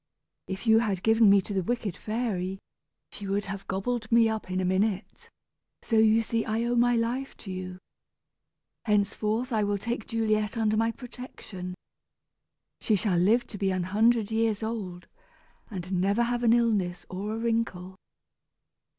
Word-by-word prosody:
If 190 +4 -5
you 220 -1 +6
had 200 -5 -1
given 225 -1 +5
me 200 0 +6
to 205 - -6
the 190 - +1
wicked 210 -2 -2
fairy, 200 -4 -2 0.5
she 200 - -7
would 200 +1 -1
have 195 0 -6
gobbled 220 +4 -2
me 230 -1 +6
up 220 -3 -3
in 185 0 -1
a 185 - 0
minute, 190 +2 -1 0.5
so 225 - +1
you 220 +1 +5
see 230 0 -1
I 225 +1 -1
owe 240 0 0
my 240 0 +4
life 240 +4 -2
to 195 - -8
you. 185 0 -6 1.1
Henceforth 215 +3 0
I 215 -1 +2
will 205 0 0
take 230 +2 -4
Juliet 215 -1 0
under 215 -1 +2
my 225 +1 +2
protection. 225 -7 -9 1.0
She 215 - +2
shall 190 -3 +1
live 225 +7 +3
to 205 - -9
be 195 - +1
an 185 -1 0
hundred 220 +3 +2
years 220 -1 +1
old, 195 -6 -4 0.6
and 185 -3 -5
never 200 +5 +2
have 240 0 -1
an 230 -1 +4
illness 205 -7 +1
or 205 +4 -4
a - - -4
wrinkle." 225 -6 -2
215 Hz, 165 wpm, -28 LUFS, 195-230 Hz, 1.1 s, you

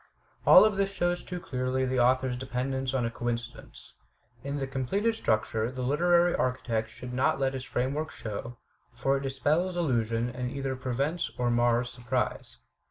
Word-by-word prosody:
All - - +10
of 215 -3 +1
this 195 0 +1
shows 175 -2 0
too 180 -1 -6
clearly 130 -6 -1
the 130 0 0
author's 130 +1 +3
dependence 130 +1 -2
on 125 -3 +1
a 115 - -2
coincidence. 115 - -5 0.5
In 140 +1 -3
the 135 - -2
completed 135 - 0
structure 110 - 0
the 130 0 -5
literary 175 +6 +3
archi 130 0 0
tect 110 0 +1
should 125 +3 -9
not 130 +2 +2
let 135 0 +1
his 130 -1 -4
framework 135 +5 -2
show, 115 +3 -6 0.3
for 135 +3 0
it - - -4
dispels 150 +7 0
illusion 115 -7 0
and 125 0 -3
either 135 0 -3
prevents 140 +6 -1
or 120 -1 +1
mars 120 0 +2
surprise. 120 -1 -3
130 Hz, 165 wpm, -28 LUFS, 120-145 Hz, 0.5 s, All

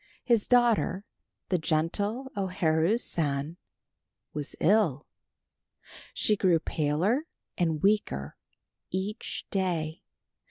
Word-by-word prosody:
His 235 -4 +2
daughter, 235 -5 +3 0.4
the 180 - +2
gentle 200 +11 -1
O 195 -1 -1
Haru 170 +2 +2
San, 150 - -1 0.8
was 150 -1 -5
ill. 170 -8 +3 1.1
She 215 - +3
grew 185 -4 +3
paler 165 - 0 0.3
and 160 -4 0
weaker 195 - +1 0.5
each 195 +4 -4
day. 170 -5 -1
185 Hz, 90 wpm, -28 LUFS, 155-210 Hz, 1.1 s, daughter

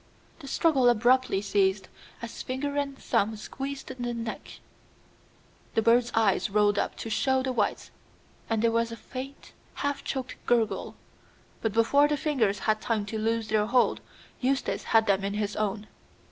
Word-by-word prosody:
The 280 - -10
struggle 270 -4 +3
abruptly 240 -3 +3
ceased 195 -1 +1 0.4
as 235 - -6
finger 280 +3 -3
and 280 -1 -2
thumb 220 -2 0
squeezed 270 +6 -6
the 245 -2 -4
neck; 230 -1 -6 1.2
the 225 - +3
bird's 235 +1 +4
eyes 210 -3 +2
rolled 205 0 +3
up - - -2
to 225 - -5
show 265 +3 +1
the 260 - -1
whites, 225 -5 -1 0.6
and 225 -1 0
there 230 - +4
was 230 0 0
a 230 - -6
faint, 270 +3 -9 0.2
half 285 0 -2
choked 260 -1 -5
gurgle. 230 -3 +1 0.7
But 225 -3 -1
before 255 +6 +4
the 295 0 0
fingers 250 -10 +1
had 215 -1 +2
time 220 -3 -1
to 220 +2 -4
loose 225 0 -1
their 215 -1 +2
hold, 245 +2 +2 0.4
Eustace 265 +1 -1
had 225 -1 +4
them 195 -1 +2
in 200 +1 -2
his 210 -1 -2
own. 210 0 -2
230 Hz, 160 wpm, -27 LUFS, 215-260 Hz, 1.2 s, bird's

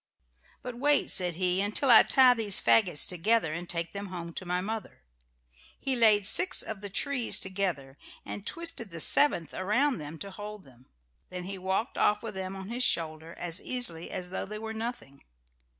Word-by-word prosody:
"But 245 -1 -8
wait," 290 +2 +2
said 180 -3 +2
he, 180 +1 0
"until 215 +6 +1
I 225 - +9
tie 260 -2 +5
these 215 -5 +2
fagots 180 -9 +3
together 180 -1 0
and 175 +2 -7
take 170 -1 -3
them 200 0 -7
home 170 -2 -8
to 185 - -7
my 180 +1 -1
mother." 215 - -6 0.8
He 270 -1 -1
laid 215 -4 +4
six 365 - +4
of 215 -3 -7
the 205 - -7
trees 255 +4 +2
together 180 -8 -3 0.3
and 205 - -7
twisted 330 -7 -2
the 165 -2 -9
seventh 170 - +3
around 245 +8 0
them 150 +2 -8
to 200 +4 -9
hold 210 +1 -9
them. 130 -1 -21 0.4
Then 180 -1 -7
he 190 +1 -7
walked 190 +5 -3
off 210 +1 +1
with 220 -2 -6
them 190 0 -6
on 190 +1 -9
his 245 +2 -2
shoulder 160 -4 -2
as 175 0 0
easily 225 -10 -1
as 180 -1 -5
though - - -4
they 215 +1 -5
were 220 +1 -6
nothing. 220 - -7
195 Hz, 185 wpm, -28 LUFS, 175-225 Hz, 0.8 s, I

